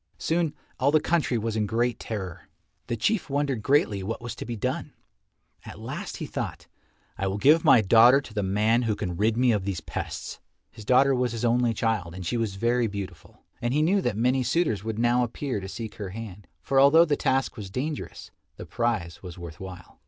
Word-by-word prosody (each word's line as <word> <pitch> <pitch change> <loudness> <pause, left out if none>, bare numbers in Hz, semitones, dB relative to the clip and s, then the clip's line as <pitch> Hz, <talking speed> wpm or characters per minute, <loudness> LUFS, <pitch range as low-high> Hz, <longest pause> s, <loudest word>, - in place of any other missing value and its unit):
Soon 165 -2 0 0.2
all - - +3
the 155 +2 +4
country 150 -6 +1
was 115 0 -2
in 105 -1 0
great 120 +3 0
terror. 95 -7 -6 0.4
The 120 - -2
Chief 210 - 0
wondered 140 -4 -1
greatly 110 -6 +2
what 105 +5 -4
was 120 -1 -6
to - - -6
be 120 - -3
done. 105 - -3 0.7
At - - -10
last - - -6
he - - -5
thought, - - -5 0.5
"I 95 - 0
will 95 +1 -2
give 150 +9 +5
my 135 -7 +7
daughter 115 +6 +6
to 125 -6 -11
the 105 - -1
man 105 +5 +2
who 115 -3 0
can 90 -4 -4
rid 110 +5 +1
me 125 0 +4
of 105 -4 0
these 95 -3 -2
pests." - - -6 0.3
His 110 -3 -12
daughter 135 +4 +5
was 125 -2 0
his 115 +1 -2
only 120 -1 +2
child 105 -7 -1
and 95 -1 -7
she 90 - -1
was 115 -4 -1
very 120 +3 +1
beautiful, 100 -5 -8 0.2
and 120 +3 0
he 150 - +3
knew 195 +5 +3
that 105 - -1
many 125 +3 +2
suitors 125 - 0
would 110 -1 -4
now 120 +2 +3
appear 125 0 -3
to 95 0 -7
seek 110 +1 -6
her 100 -3 -5
hand, 105 -1 -8 0.2
for 135 - +2
although 150 +5 +7
the 150 -3 +1
task 135 -1 0
was 105 -5 -7
dangerous, 140 +9 -5 0.3
the - - -8
prize 115 -8 -2
was 90 -2 -9
worth 85 -3 -9
while. 95 -2 -10
115 Hz, 210 wpm, -26 LUFS, 100-130 Hz, 0.7 s, my